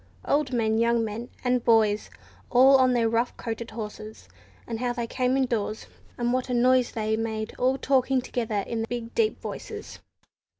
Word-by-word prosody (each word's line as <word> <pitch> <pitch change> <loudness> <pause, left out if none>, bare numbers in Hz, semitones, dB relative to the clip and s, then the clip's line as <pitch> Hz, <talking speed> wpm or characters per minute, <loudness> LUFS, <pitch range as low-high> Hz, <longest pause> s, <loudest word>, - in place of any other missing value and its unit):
Old 285 -2 +1
men, 220 -2 +1
young 235 0 +2
men, 225 +3 -6
and 250 -1 +1
boys, 215 -2 +3 0.4
all 265 +2 +7
on 255 -1 +4
their 235 -2 +2
rough 230 +2 0
coated 230 -1 -5
horses, 215 0 -8 0.4
and 230 -1 -5
how 245 0 -1
they 240 -1 -3
came 255 +2 0
indoors, 225 -5 -1 0.3
and 240 0 0
what 255 0 -1
a 250 - 0
noise 250 0 +3
they 220 -1 0
made 220 -1 -3
all 260 +1 +2
talking 265 -1 +2
together 225 -5 -2
in 230 - -3
their 225 - -2
big 235 -1 -5
deep 440 -2 +1
voices. - - -7
235 Hz, 175 wpm, -26 LUFS, 225-255 Hz, 0.4 s, all